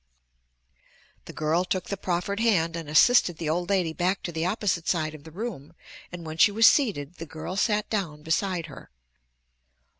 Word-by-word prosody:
The -, -, -9 dB
girl 155 Hz, +3 st, 0 dB
took 185 Hz, 0 st, -3 dB
the 200 Hz, -, -1 dB
proffered 185 Hz, +2 st, -2 dB
hand 175 Hz, -8 st, +2 dB
and 165 Hz, -3 st, -6 dB
assisted 175 Hz, +2 st, +5 dB
the 165 Hz, -, -4 dB
old 175 Hz, +3 st, -1 dB
lady 180 Hz, -5 st, +1 dB
back 185 Hz, +4 st, -1 dB
to 170 Hz, -, -4 dB
the 165 Hz, +1 st, -2 dB
opposite 185 Hz, -4 st, -1 dB
side 155 Hz, -3 st, 0 dB
of 150 Hz, -2 st, -12 dB
the 160 Hz, -, -11 dB
room 170 Hz, -, -7 dB, 0.4 s
and 175 Hz, -1 st, -8 dB
when 160 Hz, 0 st, -7 dB
she 205 Hz, -, +6 dB
was 225 Hz, +2 st, +4 dB
seated 180 Hz, -, +3 dB
the 165 Hz, -, -7 dB
girl 160 Hz, +4 st, -6 dB
sat 210 Hz, +1 st, +1 dB
down 165 Hz, -9 st, -3 dB
beside 170 Hz, +1 st, -1 dB
her. 145 Hz, -, -12 dB
175 Hz, 180 wpm, -26 LUFS, 160-200 Hz, 0.4 s, she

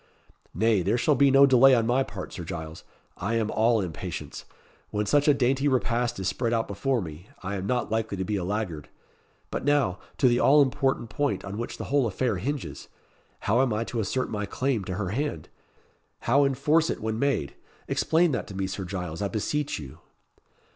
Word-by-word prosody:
"Nay, 110 Hz, -3 st, +3 dB
there 100 Hz, +7 st, +1 dB
shall 150 Hz, +5 st, +3 dB
be 140 Hz, +1 st, +4 dB
no 135 Hz, +1 st, +7 dB
delay 135 Hz, 0 st, +6 dB
on 115 Hz, -2 st, +2 dB
my 125 Hz, +3 st, +2 dB
part, 100 Hz, -8 st, -6 dB
Sir 90 Hz, -, -6 dB
Giles. 80 Hz, -2 st, -7 dB, 0.3 s
I 110 Hz, +5 st, -2 dB
am 110 Hz, -2 st, 0 dB
all 115 Hz, 0 st, +3 dB
impatience. 85 Hz, -5 st, -6 dB, 0.4 s
When 105 Hz, 0 st, -1 dB
such 145 Hz, +8 st, +2 dB
a 145 Hz, -, +7 dB
dainty 135 Hz, +1 st, +1 dB
repast 120 Hz, -4 st, 0 dB
is 95 Hz, -, -2 dB
spread 115 Hz, +5 st, -1 dB
out 115 Hz, -1 st, 0 dB
before 120 Hz, +3 st, -1 dB
me, 80 Hz, +3 st, -10 dB
I 95 Hz, +2 st, -3 dB
am 95 Hz, -1 st, -3 dB
not 120 Hz, -1 st, -1 dB
likely 110 Hz, -2 st, -1 dB
to 95 Hz, -, -1 dB
be 105 Hz, -, -1 dB
a 95 Hz, -, -2 dB
laggard. 90 Hz, -6 st, -3 dB, 0.6 s
But -, -, -3 dB
now, 140 Hz, -10 st, +2 dB, 0.2 s
to 130 Hz, -, +4 dB
the 120 Hz, 0 st, +3 dB
all 145 Hz, +1 st, +6 dB
important 130 Hz, -3 st, -1 dB
point 145 Hz, -6 st, -1 dB
on 100 Hz, +2 st, -5 dB
which 120 Hz, -, -5 dB
the -, -, -5 dB
whole 140 Hz, -4 st, +3 dB
affair 110 Hz, +1 st, -1 dB
hinges! 140 Hz, -, -4 dB, 0.5 s
How 115 Hz, +5 st, +2 dB
am 135 Hz, -3 st, +1 dB
I 110 Hz, +1 st, 0 dB
to 115 Hz, 0 st, -4 dB
assert 110 Hz, +5 st, -1 dB
my 105 Hz, -2 st, -3 dB
claim 130 Hz, -6 st, -1 dB
to 90 Hz, -, -4 dB
her 95 Hz, -2 st, -2 dB
hand 120 Hz, -, -3 dB, 0.7 s
how 140 Hz, +4 st, +3 dB
enforce 150 Hz, +5 st, +2 dB
it -, -, -2 dB
when 110 Hz, 0 st, -3 dB
made? 140 Hz, -, 0 dB, 0.3 s
Explain 165 Hz, +1 st, +2 dB
that 130 Hz, -, -2 dB
to 100 Hz, -, -9 dB
me, 95 Hz, 0 st, -1 dB
Sir 95 Hz, 0 st, -4 dB
Giles, 90 Hz, -3 st, -5 dB
I 100 Hz, -, +1 dB
beseech 140 Hz, +8 st, -2 dB
you." 70 Hz, -4 st, -10 dB
115 Hz, 200 wpm, -26 LUFS, 100-135 Hz, 0.7 s, no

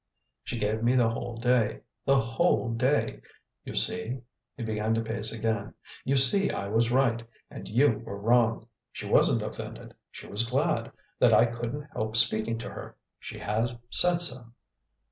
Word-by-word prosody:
She -, -, -5 dB
gave 110 Hz, 0 st, -1 dB
me 120 Hz, +2 st, +2 dB
the 120 Hz, -3 st, +3 dB
whole 115 Hz, 0 st, -5 dB
day 120 Hz, -2 st, +1 dB, 0.2 s
the 135 Hz, 0 st, +4 dB
whole 115 Hz, +1 st, +1 dB
day! 130 Hz, +5 st, 0 dB, 0.4 s
You -, -, -8 dB
see" 125 Hz, +3 st, -1 dB, 0.4 s
he 120 Hz, -, -5 dB
began 110 Hz, 0 st, -1 dB
to 115 Hz, -, 0 dB
pace 110 Hz, -1 st, -3 dB
again 110 Hz, -2 st, -2 dB, 0.3 s
"you 135 Hz, -, 0 dB
see 135 Hz, +10 st, +4 dB
I 100 Hz, -, -3 dB
was 115 Hz, +2 st, +1 dB
right, 125 Hz, -3 st, +2 dB, 0.3 s
and -, -, -9 dB
you 120 Hz, 0 st, +3 dB
were 100 Hz, -, -7 dB
wrong. 115 Hz, +2 st, +2 dB, 0.3 s
She -, -, -7 dB
wasn't -, -, +3 dB
offended -, -, -7 dB, 0.2 s
she -, -, -11 dB
was 115 Hz, +3 st, -2 dB
glad 130 Hz, +3 st, 0 dB, 0.3 s
that -, -, +5 dB
I 115 Hz, -, +6 dB
couldn't 120 Hz, +4 st, -4 dB
help 110 Hz, +1 st, -1 dB
speaking 110 Hz, 0 st, +3 dB
to 115 Hz, -, -6 dB
her; -, -, -9 dB, 0.2 s
she -, -, -9 dB
has 115 Hz, +4 st, -1 dB, 0.2 s
said 175 Hz, -1 st, +4 dB
so." 125 Hz, -6 st, -4 dB
115 Hz, 165 wpm, -28 LUFS, 110-125 Hz, 0.4 s, I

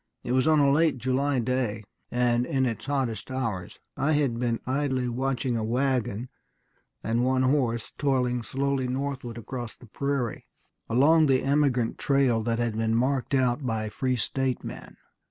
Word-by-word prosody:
"It -, -, -3 dB
was 130 Hz, +3 st, +2 dB
on 155 Hz, -1 st, +5 dB
a 140 Hz, -1 st, +4 dB
late 155 Hz, -1 st, +3 dB
July 130 Hz, +3 st, 0 dB
day, 120 Hz, -3 st, -1 dB, 0.3 s
and 120 Hz, -1 st, +2 dB
in 135 Hz, -4 st, +1 dB
its 115 Hz, +1 st, -3 dB
hottest 130 Hz, -7 st, -2 dB
hours. 115 Hz, -9 st, -3 dB, 0.2 s
I 155 Hz, +3 st, +1 dB
had 140 Hz, -6 st, +1 dB
been 120 Hz, -2 st, 0 dB
idly 130 Hz, -1 st, 0 dB
watching 125 Hz, 0 st, -1 dB
a 115 Hz, -, -1 dB
wagon 125 Hz, -1 st, -1 dB, 0.7 s
and 115 Hz, +2 st, +1 dB
one 130 Hz, 0 st, +2 dB
horse 130 Hz, -4 st, 0 dB
toiling 125 Hz, -4 st, +1 dB
slowly 135 Hz, +2 st, -1 dB
northward 130 Hz, -2 st, -3 dB
across 120 Hz, 0 st, -6 dB
the -, -, -15 dB
prairie, 135 Hz, 0 st, -3 dB, 0.4 s
along 150 Hz, +7 st, +5 dB
the 130 Hz, -1 st, +3 dB
emigrant 135 Hz, -4 st, +1 dB
trail 135 Hz, -5 st, +2 dB
that 115 Hz, -1 st, 0 dB
had 120 Hz, -2 st, -1 dB
been 110 Hz, 0 st, +1 dB
marked 130 Hz, +3 st, +1 dB
out 130 Hz, +1 st, +1 dB
by 110 Hz, -3 st, -2 dB
free 130 Hz, +3 st, -1 dB
state 130 Hz, +2 st, -1 dB
men.... -, -, -9 dB
130 Hz, 160 wpm, -27 LUFS, 120-135 Hz, 0.7 s, on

